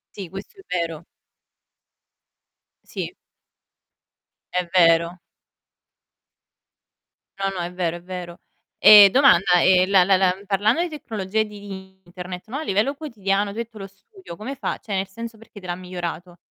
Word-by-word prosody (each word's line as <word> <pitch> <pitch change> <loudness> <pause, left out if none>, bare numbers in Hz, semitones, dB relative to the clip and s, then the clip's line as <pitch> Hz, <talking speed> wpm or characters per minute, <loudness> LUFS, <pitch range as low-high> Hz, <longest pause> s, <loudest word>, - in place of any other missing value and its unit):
Sì, 190 -5 -7
questo 195 - -10
è - - -14
vero. 170 -3 -3 1.8
Sì. - - -6 1.4
È 180 -1 -1
vero. 170 -1 +3 2.2
No, 195 0 0
no, 190 -2 -6
è 175 +1 -4
vero, 175 -2 -2
è 175 - -14
vero. 180 -2 -8 0.4
Ehm, 205 -2 +9
domanda: 190 -9 +4
ehm, 185 0 +4
la 190 -2 +5
la 190 0 +3
la 185 -1 +2
parlando 210 - +1
di 350 - -2
tecnologie 220 - -3
di 195 -2 -11
Internet, 180 +2 -9
no, 255 +6 -5
a 315 - -4
livello 220 +3 0
quotidiano 205 -9 -2
tu 215 - -11
hai 235 - -1
detto 225 -1 -18
lo 195 - -7
studio 380 - -14
come 240 +8 -7
fa 275 - -4
cioè 205 - -8
nel 190 0 -1
senso 230 +3 -9
perché 220 -1 -15
te 185 - -14
l'ha 175 - -3
migliorato? 175 -1 -7
195 Hz, 155 wpm, -22 LUFS, 180-215 Hz, 2.2 s, Ehm